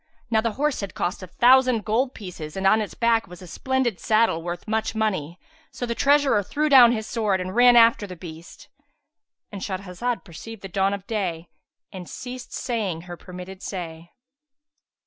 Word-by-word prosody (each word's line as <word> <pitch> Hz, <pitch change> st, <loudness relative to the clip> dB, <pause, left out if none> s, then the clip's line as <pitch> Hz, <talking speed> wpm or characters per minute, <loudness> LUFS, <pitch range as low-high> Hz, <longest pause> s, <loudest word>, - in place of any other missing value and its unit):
Now 220 Hz, -1 st, +3 dB
the 230 Hz, -1 st, -1 dB
horse 295 Hz, +2 st, 0 dB
had 200 Hz, -2 st, -6 dB
cost 175 Hz, +3 st, -2 dB
a 185 Hz, -, -8 dB
thousand 250 Hz, +2 st, +4 dB
gold 250 Hz, +5 st, 0 dB
pieces 175 Hz, -5 st, -8 dB
and 190 Hz, -, -2 dB
on 215 Hz, +3 st, +5 dB
its 210 Hz, -, -5 dB
back 230 Hz, -2 st, +2 dB
was 180 Hz, +1 st, -12 dB
a -, -, -9 dB
splendid 250 Hz, +3 st, -1 dB
saddle 215 Hz, -6 st, +2 dB
worth 175 Hz, +3 st, -6 dB
much 220 Hz, +1 st, -1 dB
money; 185 Hz, -7 st, -2 dB, 0.3 s
so 245 Hz, -, -5 dB
the 235 Hz, -, -2 dB
treasurer 280 Hz, -4 st, +3 dB
threw 300 Hz, +10 st, -1 dB
down 250 Hz, -4 st, +8 dB
his 220 Hz, -2 st, -2 dB
sword, 215 Hz, -5 st, 0 dB
and 185 Hz, +2 st, -5 dB
ran 245 Hz, 0 st, +7 dB
after 230 Hz, -3 st, +5 dB
his 180 Hz, -2 st, -9 dB
beast.—And 205 Hz, -, -14 dB
Shahrazad 195 Hz, +5 st, -3 dB
perceived 200 Hz, +4 st, -10 dB
the 195 Hz, -, -6 dB
dawn 195 Hz, +2 st, +1 dB
of 200 Hz, -1 st, -11 dB
day 180 Hz, -7 st, -3 dB, 0.4 s
and 180 Hz, -2 st, -9 dB
ceased 250 Hz, -1 st, -8 dB
saying 210 Hz, -9 st, -3 dB
her 175 Hz, 0 st, -8 dB
permitted 180 Hz, +2 st, -10 dB
say. 170 Hz, -3 st, -7 dB
210 Hz, 175 wpm, -24 LUFS, 180-240 Hz, 0.4 s, down